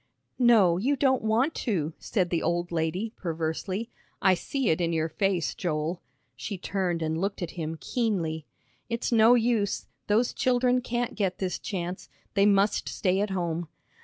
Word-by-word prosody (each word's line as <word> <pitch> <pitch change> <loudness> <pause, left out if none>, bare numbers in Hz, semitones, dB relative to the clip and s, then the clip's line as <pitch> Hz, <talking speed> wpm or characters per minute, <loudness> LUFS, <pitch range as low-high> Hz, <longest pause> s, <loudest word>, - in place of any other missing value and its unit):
"No, 220 -9 +5
you 270 +8 +2
don't 265 -1 +2
want 230 +8 +2
to," 165 - -1
said 185 -5 -1
the 170 - +1
old 175 +1 -1
lady, 175 +7 -1
perversely. 170 +6 -3 0.3
"I 190 - +5
see 260 +7 -1
it 160 - 0
in 170 -1 +1
your 160 0 0
face, 185 0 0
Joel." 165 0 -2 0.3
She 200 - -5
turned 180 -3 -1
and 160 +1 -1
looked 195 -1 -2
at 170 - -4
him 160 -2 -4
keenly. 170 - -1 0.4
"It's 235 +1 -2
no 230 +1 +6
use, 225 -4 +1 0.2
those 220 +4 +2
children 250 0 +2
can't 240 0 -2
get 190 -3 -1
this 185 -2 -2
chance. 180 -2 -5 0.2
They 200 0 +4
must 200 +1 +2
stay 185 -1 +1
at 205 - 0
home." 175 -3 -2
190 Hz, 160 wpm, -27 LUFS, 170-225 Hz, 0.4 s, no